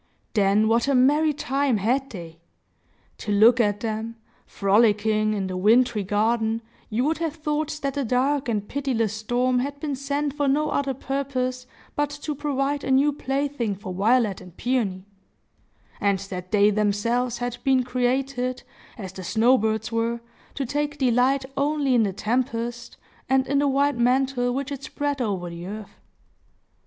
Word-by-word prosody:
Then 205 +1 +3
what 230 +3 +2
a 280 - +3
merry 295 +5 +4
time 275 -3 0
had 255 +7 0
they! 165 -4 -9 0.8
To 210 - -4
look 225 +4 +6
at 205 -3 +1
them, 225 0 -3 0.3
frolicking 215 +1 +2
in 195 -2 -2
the 185 -1 -4
wintry 220 +3 +3
garden, 220 +3 0 0.3
you 225 +3 0
would 315 +3 0
have 325 -2 -2
thought 305 -1 -2
that 275 -1 -1
the 285 0 -1
dark 265 +3 +1
and 210 -3 -1
pitiless 250 -7 -1
storm 245 +4 0
had 280 +2 -3
been 290 -2 -2
sent 280 +1 -2
for 290 -1 0
no 300 +3 +1
other 275 -2 0
purpose 255 -2 -3 0.3
but 290 -1 0
to 290 +1 -5
provide 285 0 -1
a - - -4
new 275 +3 +4
plaything 270 -6 -2
for 190 -1 -7
Violet 215 +1 +2
and 180 -1 -14
Peony; 210 -7 -1 0.9
and 200 -2 +2
that 185 -2 -7
they 210 0 +5
themselves 225 +4 0
had 245 0 -3
been 265 -2 +3
created, 255 +1 -1 0.3
as 190 -5 -7
the 190 - -8
snow 230 +8 +4
birds 220 -1 -1
were, 230 +1 -1 0.4
to 275 - -2
take 290 +3 -2
delight 260 +1 +2
only 285 -1 +1
in 240 - +4
the 205 -3 +1
tempest, 235 +3 -2 0.3
and 265 0 +3
in 280 +1 +1
the 285 - +2
white 280 0 +2
mantle 250 0 +2
which 275 +2 -3
it 280 -1 -5
spread 285 -1 -3
over 190 -6 -2
the 170 +1 -7
earth. 210 +1 -8
245 Hz, 165 wpm, -24 LUFS, 215-275 Hz, 0.9 s, look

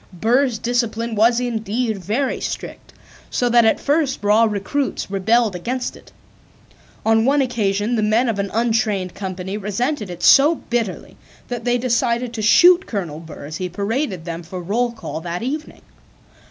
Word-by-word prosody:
Burr's 235 +6 +1
discipline 235 0 -1
was 230 +3 +3
indeed 225 -2 -2
very 245 +9 -1
strict, - - -6 0.4
so 245 - 0
that 235 -1 +5
at 220 - +3
first 285 -5 0
raw 210 +3 +4
recruits 215 +3 -2
rebelled 215 +2 +2
against 245 +8 -3
it. - - -17 0.9
On 225 0 +4
one 275 +4 +3
occasion 220 -3 0
the 220 - +1
men 220 +4 +2
of 220 -3 -1
an 200 0 -1
untrained 220 -5 0
company 190 0 -5
resented 210 +3 -2
it 175 -1 -8
so 290 +4 +6
bitterly 230 - -4 0.3
that 240 -2 -5
they 245 0 +2
decided 240 0 0
to 225 - -4
shoot 350 - +6
Colonel 175 -8 -4
Burr 160 -3 -10
as 155 +2 -6
he 185 -1 -3
paraded 200 - -2
them 170 -1 -5
for 175 +2 -7
roll 225 +7 -1
call 220 -8 -7
that 175 +4 -4
evening. 300 +5 -5
225 Hz, 160 wpm, -20 LUFS, 195-245 Hz, 0.9 s, so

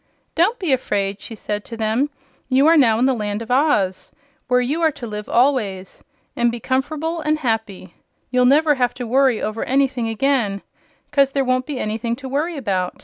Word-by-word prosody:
"Don't 385 +9 +2
be 355 - 0
afraid," 200 -6 -1
she 225 - -8
said 210 0 -4
to 230 - -8
them. 225 +6 0 0.4
"You 265 +2 +4
are 325 +1 +6
now 235 -8 +4
in 245 - +2
the 265 - +3
Land 210 -1 -3
of 230 - -8
Oz, 245 -9 +1 0.4
where 250 -1 +3
you 280 +7 -1
are 325 - +4
to 275 -4 -8
live 210 -2 -6
always, 220 -8 0 0.3
and 240 0 +2
be 235 - -6
comfer'ble 310 +7 -2
an' 305 0 +2
happy. 220 - -3 0.4
You'll 250 0 +3
never 295 +4 +4
have 245 -3 0
to 250 -1 -5
worry 260 0 +2
over 215 +1 -2
anything 265 -3 0
again, 225 -4 0 0.5
'cause 275 -2 +3
there 275 -1 +1
won't 255 +1 0
be 290 -3 -4
anything 225 +2 -2
to 265 +1 -9
worry 300 +5 -2
about. 190 -8 -2
250 Hz, 195 wpm, -20 LUFS, 220-280 Hz, 0.5 s, are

